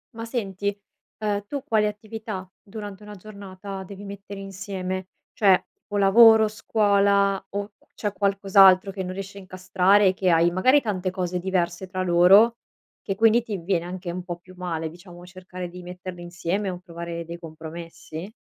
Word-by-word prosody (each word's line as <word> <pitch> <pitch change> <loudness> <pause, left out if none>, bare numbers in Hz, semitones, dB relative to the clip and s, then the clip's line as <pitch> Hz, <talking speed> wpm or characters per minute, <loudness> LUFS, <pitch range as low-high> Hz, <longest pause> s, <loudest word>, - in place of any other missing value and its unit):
Ma 230 0 -5
senti, 200 -4 -3 0.4
ehm, 205 -1 -2
tu 280 +1 -4
quali 220 -6 +2
attività, 210 -2 -6
durante 205 -1 -9
una 210 0 -10
giornata, 195 -1 -9
devi 195 +1 -10
mettere 200 0 -8
insieme? 190 -1 -5 0.2
Cioè, 195 -4 +4 0.3
o 205 - -2
lavoro, 220 +2 +7
scuola, 200 -2 +2
o 205 +1 -4
cu - - -31
c'è 205 -2 -3
qualcos'altro 195 -1 +5
che 190 -1 -5
non 185 0 -5
riesci 195 +1 -7
a - - -7
incastrare 185 +2 +2
e 185 - +3
che 185 -1 0
hai 170 0 +4
magari, 255 +11 +4
tante 190 -5 -2
cose 180 -1 -2
diverse 180 0 -1
tra 185 0 -3
loro 190 +6 +6 0.4
che, 195 - -3
quindi, 225 +3 +4
ti 215 -4 -4
viene 175 -1 -1
anche 180 -1 -5
un 180 +1 -5
po' 175 -1 -5
più 185 +1 -17
male, 165 -3 -3
diciamo, 175 +1 -13
cercare 180 0 -8
di 180 +1 -10
metterle 180 0 -8
insieme 180 +3 -3
o 180 - -5
provare 170 -1 -7
dei 170 +1 -7
compromessi? 165 +2 -9
190 Hz, 170 wpm, -24 LUFS, 180-205 Hz, 0.4 s, lavoro